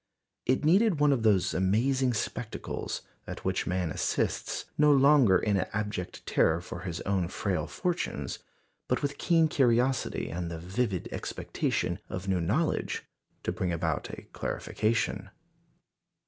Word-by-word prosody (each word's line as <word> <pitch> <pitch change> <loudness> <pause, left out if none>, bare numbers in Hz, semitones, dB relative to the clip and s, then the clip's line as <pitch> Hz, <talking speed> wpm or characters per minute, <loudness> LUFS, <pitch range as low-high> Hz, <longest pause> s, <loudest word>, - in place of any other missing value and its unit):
It 130 +4 +2
needed 190 +1 +4
one 145 -1 +5
of 125 - 0
those 95 -5 +3
amazing 120 +8 +2
spectacles, - - -4 0.2
at - - -7
which - - 0
man 90 -3 0
assists, - - -1
no 150 0 +5
longer 135 -8 +6
in 105 -2 +1
abject 105 -1 -3
terror 80 +1 +3
for 90 0 -7
his 85 -2 -5
own 95 -3 0
frail 90 -3 -2
fortunes, 180 -2 -2 0.5
but - - 0
with 140 0 -2
keen 165 -2 +4
curiosity 130 - +2
and 85 +1 -3
the 85 - -5
vivid 95 +3 -2
expectation - - -2
of 95 +1 -5
new 95 -2 +1
knowledge, 125 - 0 0.4
to - - 0
bring 90 -1 -2
about 80 -2 -1
a - - -8
clarification. 110 +1 -1
105 Hz, 135 wpm, -29 LUFS, 90-135 Hz, 0.5 s, longer